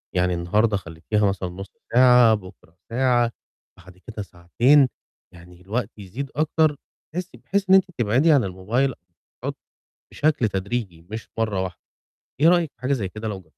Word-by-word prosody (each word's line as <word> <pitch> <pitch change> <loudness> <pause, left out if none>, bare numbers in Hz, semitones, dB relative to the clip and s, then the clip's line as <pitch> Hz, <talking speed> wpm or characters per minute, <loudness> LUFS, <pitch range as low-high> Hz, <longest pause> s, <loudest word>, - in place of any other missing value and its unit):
يعني 90 0 +2
النهاردة 100 +5 +1
خليتيها 90 +4 -2
مثلًا 95 -2 -2
نُصّ 95 +2 -9 0.2
ساعة، 125 -2 +7
بُكرة 90 -3 -13
ساعة، 120 -1 +2 0.5
بعد 90 0 -16
كده 110 +1 -8
ساعتين، 120 +11 +3 0.5
يعني 90 +1 -15
الوقت 110 +4 -3
يزيد 120 +8 -7
أكتر، 155 0 +2 0.4
تحسي 180 +1 -5
بحيث 200 -1 -2
إن 190 - +8
أنتِ 190 -1 +5
تبعدي 125 +8 +3
عن 140 -4 +5
الموبايل 110 +8 -1 1.2
بشكل 150 -7 +1
تدريجي 95 -3 -4
مش 110 0 -6
مرّه 105 -4 0
واحدة، 90 -3 -6 0.6
إيه 160 - +6
رأيِك 170 -3 +3
في - - -37
حاجة 135 +2 0
زي 100 -8 -2
كده 110 +3 -6
لو 100 -3 -4
جر 80 - -26
110 Hz, 155 wpm, -23 LUFS, 95-130 Hz, 1.2 s, إن